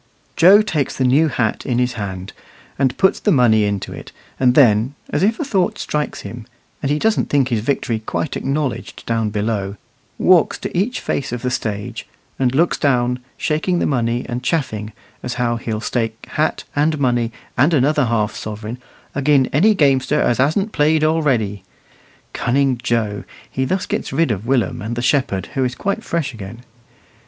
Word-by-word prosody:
Joe 195 +6 +7
takes 150 -9 -1
the 130 - +1
new 140 +6 +4
hat 120 -6 -1
in 125 - -1
his 125 0 +1
hand, 95 -4 -6 0.5
and 130 -3 +1
puts 190 +1 +3
the 210 - +1
money 115 - +4
into 100 -1 -3
it, - - -10 0.3
and 125 -1 +3
then, 120 0 +4 0.2
as 145 - 0
if 220 +4 +2
a 310 - -1
thought 195 -9 0
strikes 150 0 -3
him, - - -8 0.3
and 140 - -1
he 145 - +2
doesn't 220 +6 +1
think 135 -3 +2
his 115 -3 +1
victory 115 -1 -1
quite 120 +6 -3
acknowledged 140 -1 -3
down 115 -2 0
below, 105 -2 -2 0.4
walks 180 -4 +4
to - - -6
each 215 +8 0
face 135 - -2
of 120 0 -4
the 125 - 0
stage, 105 -4 -4 0.3
and 130 -1 +1
looks 170 +4 +2
down, 125 -3 +1 0.2
shaking 160 +4 0
the - - +1
money, 120 -2 0
and 120 0 -3
chaffing, 110 -8 -2 0.3
as 125 0 -4
how 120 -1 0
he'll 110 -2 -3
stake 115 -1 -3
hat 155 - 0
and 155 +2 +2
money 120 -4 +1 0.2
and 140 +6 +4
another 150 -1 +3
half 110 -2 0
sovereign 110 +3 -6 0.4
"agin 140 -1 +3
any 205 +10 +4
gamester 140 -1 +2
as 120 0 +1
hasn't 180 +11 +1
played 155 -1 +2
already." 130 - +1 0.7
Cunning 130 0 +1
Joe! 115 -4 -1 0.3
he 130 +2 -1
thus 185 +7 -1
gets - - -3
rid 140 0 +1
of 105 +2 -4
Willum 130 -3 +1
and 110 +3 -4
the 120 - -3
shepherd, 125 - 0
who 135 - 0
is 125 -1 -1
quite 200 - -2
fresh 155 -5 -2
again. 115 +2 -9
130 Hz, 180 wpm, -19 LUFS, 115-150 Hz, 0.7 s, Joe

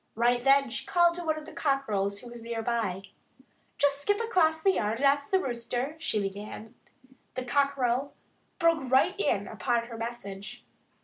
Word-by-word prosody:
Right 240 +2 +2
then 275 -2 +4
she - - -3
called 345 -1 +3
to 350 0 -5
one 315 -1 0
of 305 - -8
the - - -11
cockerels, 210 -9 0
who 240 - -10
was 240 -1 -9
near 230 0 -4
by. 220 -6 -1 0.7
"Just 285 0 +2
skip 410 +7 +1
across 360 -9 +2
the 385 +4 +4
yard 215 - 0
and 275 - 0
ask 280 +1 +3
the 380 - +4
Rooster 250 +1 -3
" - - -27
she 225 -9 0
began. 205 +3 -6 0.6
The 255 - -3
cockerel 275 0 +1 0.4
broke 330 -6 +2
right 260 +1 +4
in 200 0 +1
upon 230 +3 -1
her 230 - -7
message. 205 -4 -6
250 Hz, 180 wpm, -28 LUFS, 225-285 Hz, 0.7 s, then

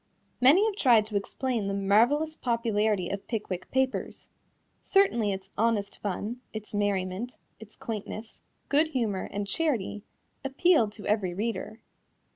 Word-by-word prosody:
Many 300 +12 +7
have 435 -3 0
tried 235 - +5
to 215 -1 -7
explain 225 +2 -1
the 195 - -1
marvelous 240 +11 +3
popularity 220 - 0
of 200 0 -5
Pickwick 190 -5 -4
Papers. 265 0 -2 0.5
Certainly 240 - +3
its 190 0 -6
honest 215 -3 0
fun, 210 +5 -4
its 215 -1 -7
merriment, 205 +2 -1 0.2
its 220 -1 -13
quaintness, 220 -3 -6 0.3
good 300 +3 +3
humor 230 -10 -2
and 205 0 -2
charity 230 -5 -1 0.4
appealed 275 -4 +3
to 210 - -7
every 200 -4 0
reader. 220 +2 -3
220 Hz, 130 wpm, -28 LUFS, 200-260 Hz, 0.5 s, Many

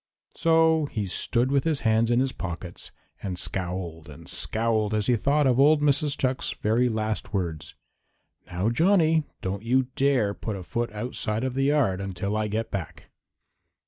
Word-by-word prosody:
So 160 -1 +3
he 105 -6 -3
stood 120 +7 0
with 140 -1 +2
his 160 -3 0
hands 110 0 +2
in 120 0 +3
his 135 0 +1
pockets 90 -3 -7 0.3
and 95 -3 -4
scowled 85 -4 -4
and 70 - -12
scowled 110 -1 0
as 105 -1 0
he 125 - +3
thought 145 +6 +2
of 130 -1 +3
old 150 +2 +6
Mrs. 145 0 +2
Chuck's 130 0 -1
very 115 +4 +1
last 110 -1 -3
words: 85 -5 -3 0.7
"Now, 90 +5 -1
Johnny, 160 +1 +3 0.2
don't 95 +1 -3
you 125 +3 +1
dare 130 -7 +2
put 105 0 -5
a 95 - -7
foot 120 +5 -3
outside 110 0 -3
of 130 -1 -1
the 135 +1 0
yard 135 -10 +2
until 100 +1 -3
I 110 0 0
get 110 +2 -3
back." 95 -6 -6
115 Hz, 170 wpm, -26 LUFS, 100-135 Hz, 0.7 s, old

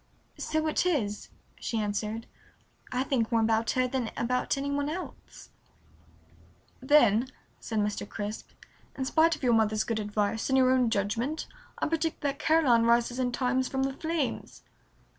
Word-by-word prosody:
"So 315 0 -1
it 310 - +1
is," 235 - -1 0.3
she 230 - -3
answered. 210 +2 -2 0.7
"I 255 +1 0
think 250 -4 0
more 230 -1 +3
about 225 0 +1
her 255 0 +3
than 250 -3 -2
about 250 +3 0
any 280 +1 -2
one 285 +1 -1
else." 360 +4 -8 1.3
"Then," 260 -4 +4 0.3
said 225 - -4
Mr. 205 -1 -1
Crisp, 210 0 -5 0.5
"in 265 - -2
spite 325 +4 +3
of 290 - -15
your 245 -2 +4
mother's 220 -1 +2
good 225 -1 -2
advice 210 +2 -1
and 265 - +3
your 255 -1 +5
own 255 -2 +3
judgment 230 +8 -1 0.3
I - - -1
predict 325 0 -1
that 280 0 -2
Caroline 285 -8 +4
rises 235 +1 +2
in 250 -1 0
time 255 +1 +1
from 265 +1 -1
the 270 0 -1
flames." 315 -2 -3
250 Hz, 160 wpm, -28 LUFS, 220-280 Hz, 1.3 s, your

